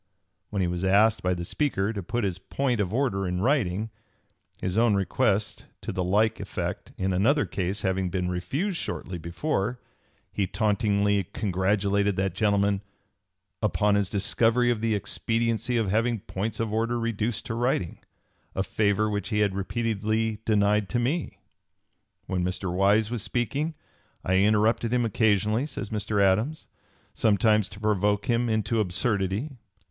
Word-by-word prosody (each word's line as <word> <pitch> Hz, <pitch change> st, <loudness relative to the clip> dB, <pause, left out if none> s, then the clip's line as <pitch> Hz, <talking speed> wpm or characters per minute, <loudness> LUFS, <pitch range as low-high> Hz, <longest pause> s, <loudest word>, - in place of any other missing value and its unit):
When 100 Hz, -2 st, -1 dB
he -, -, +1 dB
was 90 Hz, +1 st, -3 dB
asked 105 Hz, +3 st, +4 dB
by 90 Hz, 0 st, +1 dB
the 85 Hz, 0 st, -5 dB
Speaker 110 Hz, -, -1 dB
to 100 Hz, -, -4 dB
put 115 Hz, +6 st, -2 dB
his 95 Hz, -2 st, -1 dB
point 125 Hz, +3 st, -1 dB
of 95 Hz, -3 st, -2 dB
order 110 Hz, -6 st, 0 dB
in 90 Hz, 0 st, -2 dB
writing, 110 Hz, -3 st, +1 dB, 0.7 s
his 90 Hz, 0 st, -2 dB
own 115 Hz, -2 st, +4 dB
request 100 Hz, +1 st, 0 dB
to -, -, -4 dB
the 90 Hz, -, -2 dB
like 105 Hz, +5 st, +2 dB
effect -, -, -4 dB
in 95 Hz, 0 st, 0 dB
another 125 Hz, +11 st, +3 dB
case 95 Hz, +2 st, -3 dB
having 95 Hz, -1 st, 0 dB
been 90 Hz, 0 st, -1 dB
refused 140 Hz, -, -2 dB
shortly 90 Hz, -, -4 dB
before, 105 Hz, -, -2 dB, 0.5 s
he 100 Hz, -, 0 dB
tauntingly 100 Hz, -1 st, +1 dB
congratulated 100 Hz, 0 st, +1 dB
that 95 Hz, -1 st, -1 dB
gentleman 100 Hz, 0 st, +1 dB, 0.8 s
"upon 105 Hz, -1 st, +2 dB
his 100 Hz, -2 st, +1 dB
discovery 115 Hz, +4 st, +2 dB
of 115 Hz, -3 st, -2 dB
the 115 Hz, -1 st, +1 dB
expediency 115 Hz, +3 st, -1 dB
of 110 Hz, -5 st, 0 dB
having 115 Hz, 0 st, +1 dB
points 100 Hz, +3 st, -4 dB
of 110 Hz, -2 st, -1 dB
order 115 Hz, +2 st, 0 dB
reduced 115 Hz, -1 st, -2 dB
to 115 Hz, -, -3 dB
writing 115 Hz, -7 st, -1 dB, 0.6 s
a 95 Hz, -, +1 dB
favor 105 Hz, +2 st, +1 dB
which 105 Hz, -2 st, -2 dB
he 105 Hz, -2 st, +1 dB
had 100 Hz, -2 st, +2 dB
repeatedly 110 Hz, +1 st, -1 dB
denied 105 Hz, -1 st, +2 dB
to 125 Hz, -, 0 dB
me." 135 Hz, +7 st, -1 dB, 0.9 s
When 90 Hz, -1 st, -1 dB
Mr. 90 Hz, 0 st, -2 dB
Wise 100 Hz, +4 st, +3 dB
was 120 Hz, -3 st, -1 dB
speaking, 140 Hz, +9 st, -1 dB, 0.5 s
"I 95 Hz, +1 st, +2 dB
interrupted 110 Hz, +3 st, +3 dB
him 125 Hz, -1 st, +2 dB
occasionally," 110 Hz, +3 st, +2 dB
says 100 Hz, -9 st, -6 dB
Mr. 105 Hz, -1 st, -1 dB
Adams, 105 Hz, +11 st, +2 dB, 0.5 s
"sometimes 105 Hz, -1 st, +3 dB
to 100 Hz, -, -12 dB
(p. -, -, -13 dB
286) 105 Hz, -3 st, +1 dB
provoke 105 Hz, 0 st, +1 dB
him 120 Hz, 0 st, +1 dB
into 110 Hz, +1 st, 0 dB
absurdity." 105 Hz, -, -1 dB
105 Hz, 155 wpm, -26 LUFS, 95-115 Hz, 0.9 s, asked